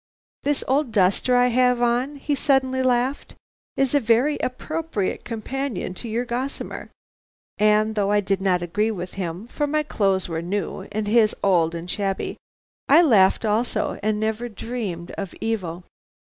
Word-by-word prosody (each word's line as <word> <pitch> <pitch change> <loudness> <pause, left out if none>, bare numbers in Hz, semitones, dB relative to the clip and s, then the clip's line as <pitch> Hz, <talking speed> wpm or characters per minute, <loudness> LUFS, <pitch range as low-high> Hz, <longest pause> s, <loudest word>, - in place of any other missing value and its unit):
"'This 290 0 0
old 270 -1 +1
duster 200 +5 +2
I 245 0 +4
have 250 0 +3
on,' 245 +4 +1
he 290 +1 -2
suddenly 265 -2 +2
laughed, 255 +2 0 0.4
'is 270 0 +1
a 290 - +5
very 245 +5 +2
appropriate 305 -5 -3
companion 235 -2 -4
to 230 +5 -7
your 235 +3 -1
gossamer,' 250 +3 -4 0.7
and 215 +1 +3
though 205 -2 0
I 210 - +4
did 195 -1 -1
not 180 -2 +1
agree 210 +6 0
with 185 -4 -5
him, 180 +1 -4
for 290 +4 -2
my 305 +1 +1
clothes 195 -9 0
were 165 -1 -3
new, 195 +4 -3
and 215 0 -2
his 215 0 +4
old 170 -4 +3
and 170 +1 -6
shabby, 195 0 -2 0.5
I 310 +5 +7
laughed 215 - +4
also 220 +3 0
and 210 0 0
never 220 +2 -2
dreamed 205 -6 -5
of 195 -4 -5
evil. 185 -6 -3
220 Hz, 160 wpm, -23 LUFS, 195-255 Hz, 0.7 s, I